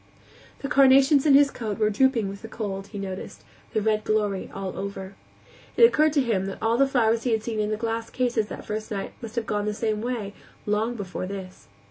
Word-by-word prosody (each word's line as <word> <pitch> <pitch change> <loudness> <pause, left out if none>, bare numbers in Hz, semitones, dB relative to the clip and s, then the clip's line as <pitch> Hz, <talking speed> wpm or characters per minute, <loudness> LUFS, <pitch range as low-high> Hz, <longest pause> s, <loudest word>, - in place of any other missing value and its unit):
The - - -1
carnations 275 +1 +5
in 280 - +7
his 280 0 +6
coat 215 -4 -4
were 215 -1 +2
drooping 235 -1 +2
with 195 +1 -7
the 225 - -8
cold, 200 -3 -5
he 210 - -9
noticed, 190 -1 -6 0.3
their 215 - 0
red 215 0 +1
glory 210 -3 0
all 195 -1 -5
over. 195 0 -6 0.6
It - - +6
occurred 310 -10 +5
to 285 -3 +3
him 200 -6 0
that 195 - -5
all 225 +1 +1
the 275 +3 +4
flowers 230 -4 +2
he 240 -1 0
had 220 -1 0
seen 225 -2 -3
in 210 0 0
the 215 - -1
glass 225 0 -3
cases 240 -4 0
that - - -8
first 215 0 -4
night 200 -2 -4
must 230 -1 -8
have 235 -2 -1
gone 205 -1 -1
the 210 0 -2
same 215 -1 -1
way, 230 -4 -3 0.3
long 215 +3 0
before 190 -3 -5
this. 190 -1 -8
220 Hz, 220 wpm, -25 LUFS, 200-245 Hz, 0.6 s, in